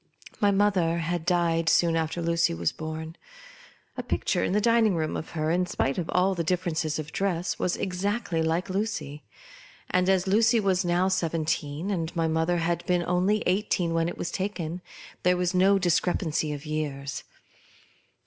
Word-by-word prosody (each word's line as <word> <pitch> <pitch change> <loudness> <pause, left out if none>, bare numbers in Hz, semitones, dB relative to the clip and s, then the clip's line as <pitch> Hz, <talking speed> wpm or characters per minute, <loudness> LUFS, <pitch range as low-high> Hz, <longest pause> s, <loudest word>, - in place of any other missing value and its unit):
My 205 - +4
mother 195 -4 +2
had 170 0 -2
died 165 -2 +2
soon 165 0 +3
after 165 +1 -1
Lucy 170 - +1
was 85 0 0
born. 160 +1 -6 0.8
A - - -3
picture - - -1
in - - 0
the 205 - +3
dining 230 -3 +3
room 155 -1 -1
of 160 - -5
her, 155 -1 -1
in 180 +1 +1
spite 135 -5 -1
of 170 - -4
all 185 +2 +2
the 170 -2 -2
difference 165 -2 -1
of 150 -1 -6
dress, 180 -3 -1
was 180 - 0
exactly 190 -1 -1
like 160 +2 0
Lucy; 190 -7 -3 0.7
and, 180 +1 +2
as 190 -1 +3
Lucy 225 +4 +4
was 195 -2 +1
now 175 +1 +2
seventeen 165 -1 -1
and 165 -4 -3
my 165 -1 +1
mother 160 +2 +1
had 170 0 -1
been 180 -1 +2
only 185 +5 +1
eigh 185 +3 +3
teen 170 -2 0
when 165 0 +1
it - - -7
was - - -3
taken, 185 -3 -3 0.4
there 180 0 +3
was 180 0 0
no 190 +2 +4
discre 180 -1 +1
pancy 155 -3 -1
of 145 +1 -6
years. 145 -3 -4
175 Hz, 175 wpm, -26 LUFS, 160-185 Hz, 0.8 s, My